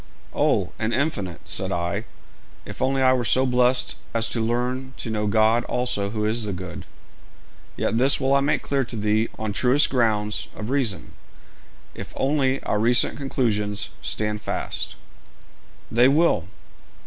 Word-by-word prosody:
'Oh, - - +1
an 115 +1 -1
infinite,' 100 - -2
said - - -1
I, 90 +6 -2 0.6
'if - - -9
only 135 0 +1
I 130 0 +5
were 125 -1 0
so 130 +4 +3
blest 125 0 +2 0.2
as 115 -1 +2
to 115 - -1
learn 125 +3 -2
to 115 - -5
know 105 -1 -1
God 110 +3 +3
also 125 -5 -1
who 105 0 -2
is 110 +2 0
the 100 - -3
good.' 90 -1 -7 0.9
'Yet 115 - 0
this 135 +3 +4
will 135 +1 +1
I 140 - +5
make 145 0 0
clear 140 -1 0
to 120 - -7
thee 105 +1 +1
on 110 -1 -3
truest 130 +7 +3
grounds 110 -4 0
of 110 +3 -5
reason, 125 -9 -1 0.8
if - - -9
only 135 -1 +1
our 105 - 0
recent 120 +2 +3
conclusions 105 -7 -1
stand 105 +3 -2
fast.' - - -4 1.0
'They 120 +2 +5
will.' 140 - +3
115 Hz, 155 wpm, -24 LUFS, 105-130 Hz, 1.0 s, I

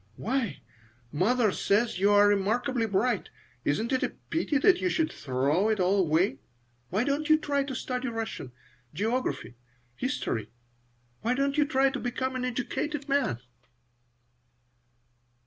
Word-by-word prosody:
Why, 230 - -2 0.5
mother 215 +7 +2
says 205 +1 +1
you 200 +2 +4
are 205 0 +6
remarkably 225 +5 +1
bright. 205 +2 0 0.3
Isn't 220 +11 0
it 260 - +2
a - - +1 0.2
pity 320 -3 +1
that 365 +4 +4
you 365 - +1
should 325 -3 0
throw 140 +10 +1
it 215 -2 +1
all 185 +2 +3
away? 160 -4 +2 0.5
Why 205 +6 +1
don't 285 +3 -1
you 310 - +7
try 285 -2 0
to 270 -1 -5
study 255 +1 -3
Russian, 225 - -4 0.4
geography, 220 - -2 0.4
history? 245 - -2 0.7
Why 235 +3 +1
don't 275 +1 0
you 300 -1 +3
try 275 -2 +2
to 275 - -4
become 260 +2 -2
an 255 0 -2
educated 275 +4 -3
man?" 275 - 0
240 Hz, 140 wpm, -28 LUFS, 200-275 Hz, 0.7 s, you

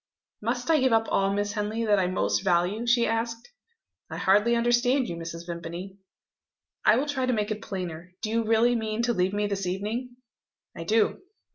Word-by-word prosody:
"Must 245 +3 -2
I 315 - +5
give 260 -2 +3
up 225 0 +3
all, 195 0 +2
Miss 205 +1 -1
Henley, 215 +2 -2
that 205 -2 +3
I 185 - +1
most 185 +1 0
value?" 190 +5 +1
she 235 0 +4
asked. 230 - -2 0.6
"I - - -6
hardly 205 +5 +3
understand 240 +2 +2
you, 170 - -4
Mrs. 165 0 -7
Vimpany." 170 +3 -7 0.8
"I 215 - +6
will 265 +5 +1
try 270 -3 -1
to 255 - +2
make 210 -1 -1
it 215 - -3
plainer. 180 -2 -6
Do 215 - -2
you 230 0 +1
really 225 +2 +3
mean 220 0 -2
to 240 0 +2
leave 185 -1 +1
me 205 +1 0
this 195 -2 -2
evening?" 220 +7 -3 0.6
"I 165 - -6
do." 220 - +2
215 Hz, 190 wpm, -27 LUFS, 190-235 Hz, 0.8 s, I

